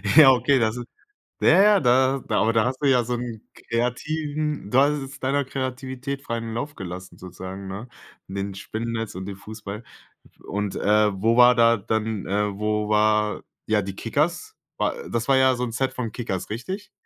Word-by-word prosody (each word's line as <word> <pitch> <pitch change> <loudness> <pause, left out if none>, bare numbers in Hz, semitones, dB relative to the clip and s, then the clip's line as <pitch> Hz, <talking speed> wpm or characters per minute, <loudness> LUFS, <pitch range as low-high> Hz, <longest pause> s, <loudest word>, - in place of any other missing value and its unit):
Ja, 145 -4 +10
okay, 130 +2 +3
das 110 +1 0
ist 120 - -6 0.5
ja, 195 - +6
ja, 210 -1 +5
da 130 +1 +3
da 105 - +2
aber 115 +1 +2
da 110 -1 +3
hast 130 +1 -2
du 145 - 0
ja 125 -3 +4
so 125 +2 -2
'n 120 -2 -5 0.3
kreativen 145 +3 -2
du 125 - +3
hast 145 +2 +5
es 135 +1 -9
deiner 140 +2 +1
Kreativität 130 +1 -4
freien 115 -4 -4
Lauf 145 +6 -4
gelassen 95 -1 -8
sozusagen, 95 +2 -8
ne? 100 +6 -7 0.4
In 95 - -8
den 100 0 -3
Spinnennetz 115 +3 -4
und 95 +1 -6
den 100 -1 -6
Fußball. 105 +1 -8 0.6
Und, 105 -1 -3
äh, 105 0 +3
wo 115 +3 +3
war 125 0 +8
da 115 0 +5
dann 110 0 -2
äh, 100 0 -1
wo 105 0 -1
war, 105 0 +2 0.2
ja, 105 -1 +2
die 95 0 -6
Kickers? 170 - -1 0.2
War - - 0 0.2
das 115 +1 -2
war 135 - +5
ja 130 0 +5
so 125 - -1
'n 120 - -5
Set 130 +3 -1
von 120 -4 -4
Kickers, 95 -7 -4
richtig? 185 - -5
115 Hz, 190 wpm, -24 LUFS, 105-130 Hz, 0.6 s, Ja